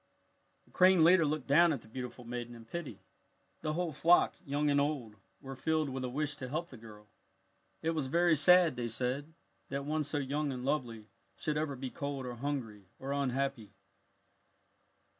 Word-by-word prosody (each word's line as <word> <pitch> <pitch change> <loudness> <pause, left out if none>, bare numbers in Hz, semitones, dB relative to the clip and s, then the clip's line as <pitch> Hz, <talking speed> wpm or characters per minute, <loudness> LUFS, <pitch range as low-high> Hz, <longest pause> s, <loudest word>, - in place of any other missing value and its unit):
The - - -26
crane 185 -2 +5
leader 165 -1 +6
looked 150 -3 -2
down 170 +4 +5
at 140 -6 -2
the - - -17
beautiful 125 +1 -7
maiden 120 0 -5
in 115 -1 -12
pity. 170 +5 -6 0.6
The 155 -1 -2
whole 170 -1 -2
flock, 170 +5 +4
young 145 -1 0
and 140 0 +3
old, 140 -7 -2 0.3
were 135 0 -7
filled 155 +2 0
with 130 0 -4
a 125 - -2
wish 145 +3 -2
to 130 -2 -6
help 170 +5 -3
the - - -11
girl. 105 -2 -13 0.8
It 165 - +1
was 155 -5 -2
very 170 +3 +3
sad, 175 +2 +5
they 120 -1 -2
said, 125 +6 -2 0.4
that 140 0 -3
one 155 +1 0
so 145 +1 -3
young 145 +1 -1
and 125 -1 -5
lovely 120 -7 -2 0.3
should 150 - -2
ever 150 -2 -1
be 130 0 -6
cold 140 -4 -4
or 125 - -4
hungry 115 -7 -4
or 135 +1 -5
unhappy. 135 -5 -2
140 Hz, 180 wpm, -32 LUFS, 125-155 Hz, 0.8 s, leader